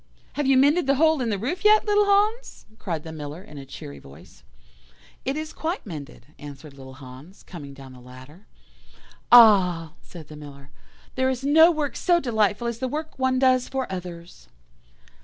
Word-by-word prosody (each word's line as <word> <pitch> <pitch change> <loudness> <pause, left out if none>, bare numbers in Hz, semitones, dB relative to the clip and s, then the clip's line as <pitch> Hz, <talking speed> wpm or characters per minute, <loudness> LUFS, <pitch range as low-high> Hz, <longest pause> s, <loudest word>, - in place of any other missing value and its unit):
"'Have 290 -2 -2
you 270 -1 +4
mended 290 +4 +3
the 275 - +3
hole 315 0 +2
in 235 - -1
the 205 - -1
roof 285 - -4
yet, 425 0 +5
little 415 -1 +2
Hans?' 420 +4 0
cried 165 -6 -4
the 160 - -8
Miller 155 +2 -8
in 150 -6 -12
a 135 - -11
cheery 70 - -10
voice. 70 +2 -17 0.8
"'It 270 +3 -2
is 310 0 -6
quite 330 +4 -4
mended,' 150 - -10
answered 145 0 -11
little 130 -1 -13
Hans, 135 +7 -14
coming 145 -6 -11
down 135 -1 -13
the 125 - -14
ladder. 130 +9 -15 0.8
"'Ah!' 185 -9 +6
said 165 -4 -13
the 150 - -12
Miller, 140 -1 -13 0.4
'there 260 0 0
is 260 0 -4
no 320 +4 +6
work 305 -5 -2
so 350 -2 +2
delightful 220 - 0
as 235 -1 -4
the 260 - -2
work 305 +2 -6
one 260 0 +1
does 255 -1 +2
for 265 -1 -3
others. 175 -2 -9
210 Hz, 180 wpm, -24 LUFS, -, 0.8 s, Ah